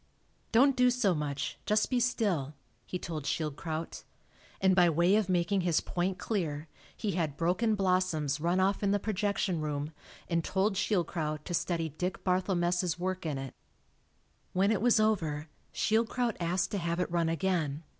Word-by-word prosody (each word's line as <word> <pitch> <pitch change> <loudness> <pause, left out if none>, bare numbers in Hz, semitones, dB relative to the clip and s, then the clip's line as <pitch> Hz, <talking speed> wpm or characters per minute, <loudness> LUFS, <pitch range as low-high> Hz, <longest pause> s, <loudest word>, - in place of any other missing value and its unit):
"Don't 265 +4 +5
do 250 -1 +5
so 240 -6 +2
much 145 -3 -3
just 215 +3 +2
be 250 - +3
still," 195 - 0 0.3
he 180 - -3
told 160 -5 -5
Schild 155 -2 -1
kraut. 160 +1 -5 0.6
And 190 -1 +4
by 175 -2 +6
way 170 +5 +3
of 215 -3 +1
making 185 +2 +2
his 175 -3 +2
point 180 +1 -2
clear, 160 -8 -2 0.3
he 210 - -1
had 160 -5 -2
"Broken 185 +7 +1
Blossoms" 180 -7 +1
run 170 +4 +1
off 195 +1 +2
in 200 - +1
the 205 - +3
projection 200 -4 -1
room, 150 0 -3 0.4
and 170 -1 0
told 195 +4 +1
Schildkraut 165 -6 -1
to 175 - -4
study 165 -1 0
Dick 180 +5 -4
Barthelmess' 180 -2 +1
work 185 -1 -3
in 145 -3 -2
it. 135 -1 -6 1.0
When 195 +3 +3
it 205 -3 +1
was 240 -1 +4
over, 160 -9 0 0.2
Schildkraut 230 +1 +1
asked 175 +2 0
to 200 - -1
have 170 0 -1
it 180 - -1
run 170 -1 +1
again. 165 -4 -1
180 Hz, 165 wpm, -30 LUFS, 160-200 Hz, 1.0 s, by